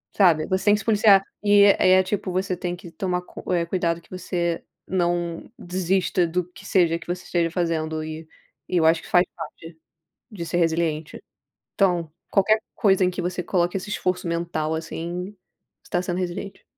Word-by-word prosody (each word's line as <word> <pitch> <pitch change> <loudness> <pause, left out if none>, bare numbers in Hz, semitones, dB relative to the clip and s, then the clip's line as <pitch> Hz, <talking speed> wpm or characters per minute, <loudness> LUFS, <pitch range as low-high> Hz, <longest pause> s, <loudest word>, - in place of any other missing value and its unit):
Sabe, 170 -6 +4
você 190 0 -1
tem 205 0 +6
que - - -2
se - - -9
policiar, 205 -3 +5 0.2
e 205 -1 +6
é 190 -2 +5
tipo 185 0 -2
você 185 0 -1
tem 175 0 -3
que 175 -1 -12
tomar 180 +1 -2
cu 180 - -8
eh, 170 -2 +2
cuidado 170 -1 -1
que 170 - -25
você 175 -2 -2 0.2
não 175 -2 -1
desista 180 0 0
do 175 +2 -1
que - - -13
seja, 170 -3 +3
que 165 - -14
você 175 +1 -3
esteja 170 -1 0
fazendo 160 -2 -1
e 155 0 -7 0.4
e 180 - +1
eu 165 - +3
acho, 160 0 +4
que - - -13
faz 180 +1 +5
parte 165 0 -9 0.6
de 180 -5 -6
ser 165 - -4
resiliente, 165 -2 0 0.5
então, 175 -5 +1 0.2
qualquer 215 +2 +3
coisa 195 -4 +3
em 180 - +2
que 180 - -4
você 180 +1 -2
coloque 175 +1 0
esse 195 +2 -5
esforço 185 -3 -1
mental, 170 -2 -1
assim, 170 +3 -4 0.5
você - - -21
tá 175 - +1
sendo 180 0 -2
resiliente. 185 +2 -5
175 Hz, 185 wpm, -24 LUFS, 170-185 Hz, 0.6 s, tem